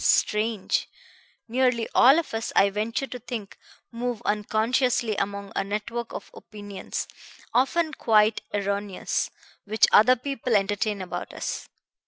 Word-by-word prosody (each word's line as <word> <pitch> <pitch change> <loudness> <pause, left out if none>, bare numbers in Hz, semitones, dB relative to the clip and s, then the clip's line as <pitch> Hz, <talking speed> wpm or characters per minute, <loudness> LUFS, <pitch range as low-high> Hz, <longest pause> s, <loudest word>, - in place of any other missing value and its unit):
Strange! 210 -1 +1 0.6
Nearly 245 -1 +1
all 270 +5 +7
of 335 -7 -2
us, 225 +1 -2
I 200 0 +5
venture 220 +6 -1
to 250 -2 -7
think, 230 -4 -7 0.3
move 240 -1 -3
unconsciously 220 +2 +1
among 200 0 -3
a - - +1
network 215 +4 -4
of - - -8
opinions, 205 -2 -6 0.5
often 305 +6 +2
quite 215 -3 +3
erroneous, 200 -1 -1 0.4
which 215 +1 +4
other 250 +5 +7
people 255 -2 -2
entertain 205 0 0
about 180 - -6
us. - - -4
220 Hz, 125 wpm, -26 LUFS, 205-245 Hz, 0.6 s, all